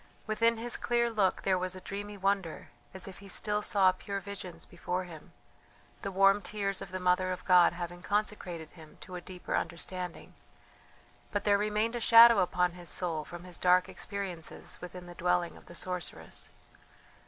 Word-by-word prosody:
Within 230 +1 +2
his 235 +1 -2
clear 235 -1 +1
look 205 -4 +1
there 185 -1 +2
was 185 0 -2
a - - -7
dreamy 205 +2 -6
wonder 195 -4 -1 0.2
as 190 0 -8
if 190 - -9
he 200 - -12
still 210 +2 0
saw 195 -3 +4
pure 200 +2 -5
visions 195 -3 -8
before 180 +1 -3
him, 165 -4 -11 0.7
the 195 - -3
warm 195 +1 +5
tears 195 0 -2
of 180 - -8
the 185 - -3
Mother 180 0 +2
of 180 - -5
God 180 -2 +6
having 175 0 -6
consecrated 190 -6 -2
him 160 -3 -15
to 185 - -10
a 180 - -5
deeper 180 0 -5
understanding. 180 0 -4 1.0
But 205 -1 -1
there 200 -1 +4
remained 215 +3 0
a - - -1
shadow 230 -1 +9
upon 180 0 +2
his 175 -1 -7
soul 165 -4 0
from 175 0 -9
his 180 -2 -9
dark 180 0 +4
experiences 190 -5 -6
within 180 0 -8
the 175 - -10
dwelling 175 0 0
of - - -16
the 175 - -11
sorceress. 180 -1 -4
185 Hz, 175 wpm, -31 LUFS, 180-205 Hz, 1.0 s, shadow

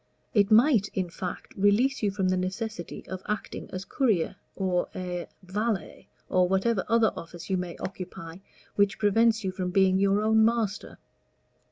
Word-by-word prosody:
It 205 -2 +4
might, 225 -2 +5
in 185 -3 -1
fact, 180 +1 -6
release 205 +7 +3
you 210 - +2
from 195 -1 0
the 185 - +2
necessity 185 0 -4
of 185 0 -6
acting 210 0 -4
as 185 +1 -6
courier, 220 - +1 0.2
or 185 -2 0
a 180 -1 -4 0.2
valet, 205 +3 -3 0.2
or 180 -1 +2
whatever 195 +2 +1
other 230 -1 +3
office 170 +2 -8
you 190 - +2
may 180 -2 -5
occupy 175 -3 -7 0.4
which 200 -1 +2
prevents 220 +1 +3
you 190 - -1
from 185 -1 -3
being 190 0 +3
your 200 +1 +2
own 220 0 +4
master. 225 -2 0
195 Hz, 160 wpm, -27 LUFS, 185-220 Hz, 0.4 s, might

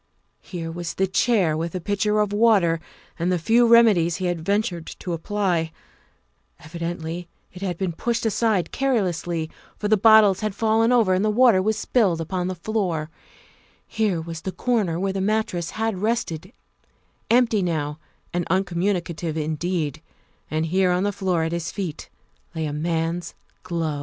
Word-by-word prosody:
Here 165 -3 -6
was 170 0 -5
the 190 - +2
chair 190 -4 +2
with 165 +1 -3
the 185 - -2
pitcher 210 +3 +1
of 205 -1 -1
water 205 -7 +4 0.4
and 175 +2 +1
the 180 - +2
few 230 +8 +3
remedies 215 -8 +5
he 185 - -3
had 175 -2 -1
ventured 200 -3 -1
to 180 - -4
apply; 175 -2 -1 0.9
evidently 170 +1 -5 0.3
it 180 - -11
had 180 -3 -2
been 190 -1 -1
pushed 235 +8 -2
aside 215 -3 +1
carelessly, 175 -11 -1 0.3
for 210 - -2
the 215 +1 +4
bottles 215 -2 +6
had 215 -2 -3
fallen 225 +2 +2
over 225 -7 +4
and 185 +2 +1
the 215 - +2
water 225 -3 +5
was 215 +2 0
spilled 195 -9 +1
upon 180 +2 -2
the 185 - -3
floor; 175 -5 -2 0.7
here 210 -6 0
was 165 0 -6
the 190 - -4
corner 205 -8 0
where 195 +1 -1
the 195 - -2
mattress 195 -4 -1
had 220 -3 -1
rested 210 -7 -2 0.8
empty 230 -3 +3
now 155 -4 -2 0.3
and 175 -1 -1
uncommunicative 175 -3 -1
indeed; 155 -1 -2 0.5
and 155 +1 -1
here 185 +3 +2
on 180 +1 +1
the 205 - +1
floor 185 -4 0
at 160 - -2
his 170 -1 -3
feet 180 -7 -5 0.5
lay 160 -1 -2
a 145 - -3
man 165 +2 -1
's 170 - -10 0.3
glove. 165 -5 -2
185 Hz, 165 wpm, -23 LUFS, 165-210 Hz, 0.9 s, bottles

